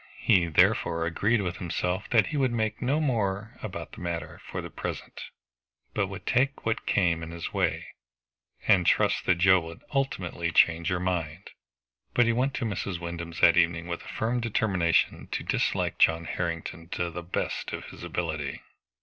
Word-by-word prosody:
He 90 -3 +3
therefore 80 +1 +3
agreed 105 +6 +1
within 90 -1 -3
himself 90 +2 -2
that 115 -3 +5
he 150 - -3
would 130 -4 +1
think 110 -1 -1
no 135 +5 +1
more 110 -6 -1
about 100 -3 -6
the 105 - -11
matter 85 -3 -4
for - - -5
the - - -6
present, - - -6 0.7
but - - +1
would - - -8
take 135 +3 +1
what 115 0 -1
came 85 -4 +2
in 80 - -6
his 85 0 -6
way, - - 0 0.8
and 95 -5 +5
trust - - +2
that 95 - +5
Joe 95 +1 +5
would 80 0 -9
ultimately 90 -11 -1
change 85 0 +4
her 90 -2 +1
mind. 90 -1 -3 0.6
But 120 - +5
he 115 - +3
went 130 +4 0
to 125 - -2
Mrs. 95 -4 -3
Wyndham's 85 0 -6
that 85 - +7
evening 85 0 +3
with 85 0 -4
a - - -13
firm 120 +3 -1
determination 100 -7 +1
to - - -2
dislike - - 0
John 80 0 +4
Harrington 85 0 -4
to 85 -1 -2
the 90 +1 -5
best 85 +1 -3
of - - -5
his - - -11
ability. 80 -5 -3
90 Hz, 175 wpm, -27 LUFS, 85-110 Hz, 0.8 s, that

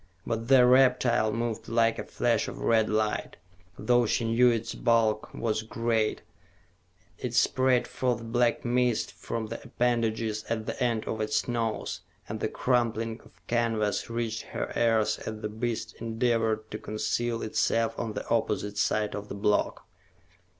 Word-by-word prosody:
But 115 0 -2
the 130 -2 +7
reptile 125 -3 +4
moved 115 0 -3
like 115 0 +2
a - - -3
flash - - 0
of - - -6
red 110 -1 +2
light, 110 0 -1 0.4
though 120 -1 +3
she 115 - 0
knew 120 +2 +4
its 115 0 -1
bulk 115 -2 +1
was 110 -1 -1
great; 110 0 -1 1.0
it - - -4
sprayed 130 -1 +3
forth 125 -3 -1
black 120 +1 +1
mist 120 -1 +1
from 115 -1 -4
the 115 +2 -6
appendages 115 -3 0
at 110 -1 -3
the 125 - -3
end 115 -3 0
of 110 - -3
its 110 0 0
nose, 115 -2 -2 0.3
and - - -5
the - - -1
crumpling 115 -2 0
of - - -22
canvas 115 -3 0
reached 115 -1 -2
her - - -5
ears 110 -2 +2
as 110 0 -6
the 105 - -3
beast 110 0 -3
endeavored 115 -1 0
to 105 - -5
conceal 115 +2 -2
itself 115 +1 +1
on 115 -2 -3
the - - -5
opposite 105 -2 -1
side 105 +1 +1
of 105 0 -5
the - - -5
block. 105 +1 0
115 Hz, 155 wpm, -28 LUFS, 110-120 Hz, 1.0 s, the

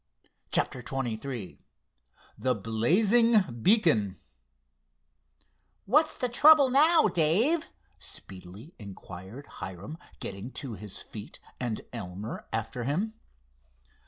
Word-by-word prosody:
CHAPTER - - +1
XXIII 120 -3 -4 0.8
THE 130 -1 0
BLAZING 185 - +2
BEACON 110 - +3 1.7
"What's 305 +9 +3
the 250 - 0
trouble 280 +2 +6
now, 310 +2 +5
Dave?" 200 - +2 0.3
speedily 95 - -11
inquired 100 +4 -10
Hiram, 95 - -8 0.2
getting 100 +5 -6
to 135 -5 -6
his 105 -1 -7
feet 105 -2 -10 0.2
and 120 -4 -3
Elmer 100 -1 -6
after 115 +2 -3
him. 190 - -1
125 Hz, 90 wpm, -28 LUFS, -, 1.7 s, trouble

